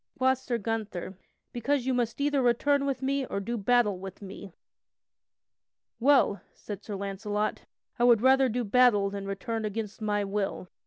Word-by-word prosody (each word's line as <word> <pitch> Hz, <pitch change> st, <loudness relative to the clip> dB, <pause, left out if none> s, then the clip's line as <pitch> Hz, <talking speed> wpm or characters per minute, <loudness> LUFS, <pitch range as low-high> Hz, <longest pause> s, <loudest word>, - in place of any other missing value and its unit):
Quoth 260 Hz, 0 st, +2 dB
Sir 245 Hz, -2 st, -2 dB
Gunther: 210 Hz, -4 st, -4 dB, 0.4 s
"Because 255 Hz, +2 st, 0 dB
you 260 Hz, -, +1 dB
must 240 Hz, -1 st, -1 dB
either 285 Hz, -1 st, +1 dB
return 280 Hz, +4 st, +2 dB
with 270 Hz, -1 st, -2 dB
me 275 Hz, +1 st, 0 dB
or -, -, -3 dB
do 235 Hz, +5 st, -3 dB
battle 220 Hz, -3 st, +2 dB
with 190 Hz, 0 st, -8 dB
me." 200 Hz, -1 st, -9 dB, 1.5 s
"Well," 255 Hz, -5 st, +4 dB
said 205 Hz, -1 st, -8 dB
Sir 210 Hz, -, -5 dB
Launcelot, 200 Hz, +2 st, -3 dB, 0.3 s
"I -, -, +2 dB
would 240 Hz, -3 st, +6 dB
rather 265 Hz, 0 st, +5 dB
do 245 Hz, +2 st, -1 dB
battle 210 Hz, -3 st, +4 dB
than 200 Hz, -1 st, -5 dB
return 220 Hz, +3 st, -3 dB
against 215 Hz, 0 st, -4 dB
my 205 Hz, -1 st, 0 dB
will." 195 Hz, -2 st, -3 dB
225 Hz, 160 wpm, -28 LUFS, 200-255 Hz, 1.5 s, would